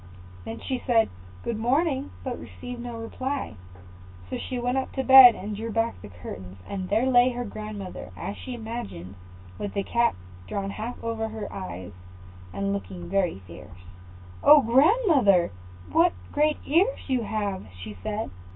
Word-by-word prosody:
Then 110 - -6
she 260 -2 -3
said, 230 -3 +3 0.3
"Good 225 -2 -2
morning," 275 +4 +1
but 255 -2 -4
received 245 -1 -8
no 240 -1 -6
reply; 260 - -4 0.7
so - - -4
she 255 - -4
went 245 +2 0
up 265 - -4
to 265 - -1
the - - -10
bed, 265 -3 +11
and 210 +1 -5
drew 225 +2 -4
back 225 +1 -1
the 105 - -9
curtains, 90 +1 -9
and 190 -2 -4
there 220 +5 +2
lay 250 -1 +5
her 245 -1 -4
grandmother, 210 -2 -7
as 200 - -4
she 255 - -7
imagined, 220 - -6 0.5
with 205 0 -4
the 200 - 0
cap 235 +3 +2 0.3
drawn 200 -1 -3
half 225 +4 -5
over 225 -1 -2
her 220 -1 -6
eyes, 95 - -6 0.6
and 100 +2 -1
looking 95 -3 -6
very 180 - 0
fierce. 90 +1 -13 0.6
"Oh, 295 -2 +8
grandmother, 260 - +4 0.4
what 335 +1 +4 0.2
great 300 +1 +2
ears 365 - +2
you 260 -3 +1
have!" 205 - -3
she 105 +3 -7
said. 215 - -3
225 Hz, 160 wpm, -26 LUFS, 195-255 Hz, 0.7 s, bed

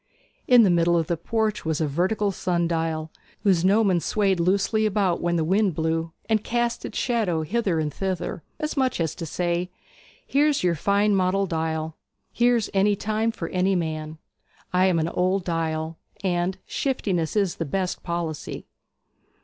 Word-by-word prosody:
In 245 -2 +7
the 195 - +4
middle 170 0 +3
of 165 - +1
the 170 - -1
porch 220 +5 -1
was 160 -1 -1
a 160 - +1
vertical 185 +8 0
sun 175 -2 0
dial, 160 -1 -2 0.3
whose 185 -4 +3
gnomon 195 -1 +4
swayed 195 +1 +1
loosely 200 +5 +2
about 195 -4 +1
when 175 0 0
the 165 - +1
wind 190 +1 +2
blew, 160 +1 -1 0.2
and 220 -2 +1
cast 240 0 -1
its - - -5
shadow 210 -10 0
hither 195 -1 0
and 150 -2 -2
thither, 190 -1 -3 0.2
as 305 0 -2
much 260 -6 +1
as 165 -3 0
to 165 - -6
say, 175 +2 -1 0.6
'Here's 290 -2 +2
your 175 -1 +3
fine 200 +5 +2
model 190 +1 +2
dial; 160 -2 -2 0.4
here's 240 -2 +3
any 200 +1 +3
time 220 +3 -1
for 185 -7 -5
any 190 +1 +1
man; 155 -2 -3 0.6
I 185 +1 +4
am 180 -3 +2
an 160 0 0
old 185 +2 0
dial; 160 -1 -2 0.2
and 180 0 0
shiftiness 190 - -1
is 200 -4 +1
the 165 - -2
best 185 +5 -2
policy.' 170 -3 -4
180 Hz, 165 wpm, -24 LUFS, 165-205 Hz, 0.6 s, In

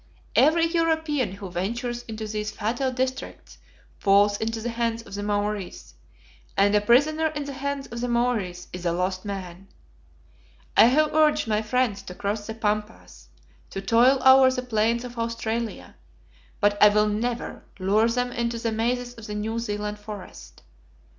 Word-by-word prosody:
Every 330 +2 +5
European 320 - 0
who 195 -2 -8
ventures 235 +7 -3
into 220 -1 -5
these 210 0 -3
fatal 240 +6 -2
districts 260 +1 -4 0.4
falls 205 +1 +4
into 225 +1 -2
the 235 +2 -3
hands 230 0 -2
of - - -13
the 200 - -4
Maories, 205 -2 -3 0.6
and 200 +1 +4
a 210 - +4
prisoner 290 +9 +3
in 295 -2 -4
the 280 - -6
hands 280 0 -3
of 235 -2 -7
the 245 - -1
Maories 235 -7 -1
is 180 -1 -6
a 170 -1 0
lost 185 +2 -2
man. 190 -2 -6 1.1
I - - +8
have 300 +6 +3
urged 305 -5 +3
my 215 -1 +1
friends 220 -2 0
to 180 -2 -10
cross 205 +2 -3
the 220 - -5
Pampas, 210 - -4 0.4
to - - -5
toil 235 +7 +4
over 265 0 +8
the 255 -1 -2
plains 230 0 +1
of 245 -1 -8
Australia, 230 0 -3 0.6
but 205 0 +2
I 210 - +9
will 210 +1 +3
never 230 +3 -3
lure 205 +4 +2
them 245 +1 -1
into 235 -1 -2
the 230 0 -2
mazes 245 +2 -1
of 230 -2 -11
the 210 - -5
New 220 +2 -2
Zealand 210 -2 -4
forest. 190 - -10
225 Hz, 165 wpm, -25 LUFS, 205-245 Hz, 1.1 s, I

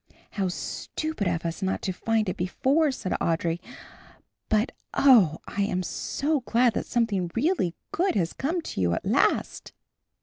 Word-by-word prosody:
"How 195 -2 -1
stupid 230 - -3
of 170 -1 -1
us 165 +3 -3
not 190 0 -1
to 190 - 0
find 220 +3 0
it 185 - -1
before," 275 - +1
said 195 -7 -5
Audry, 165 0 0 0.9
"but, 215 +3 +2 0.2
oh, 215 - +6
I 200 - -3
am 190 -2 0
so 290 - -1
glad 245 -1 +2
that - - -3
something 205 -7 0
really 245 - +1 0.2
good 375 -3 +1
has 170 -5 0
come 335 +6 -1
to 95 - -4
you 85 -1 +2
at - - -5
last." - - +1
210 Hz, 160 wpm, -26 LUFS, 180-265 Hz, 0.9 s, oh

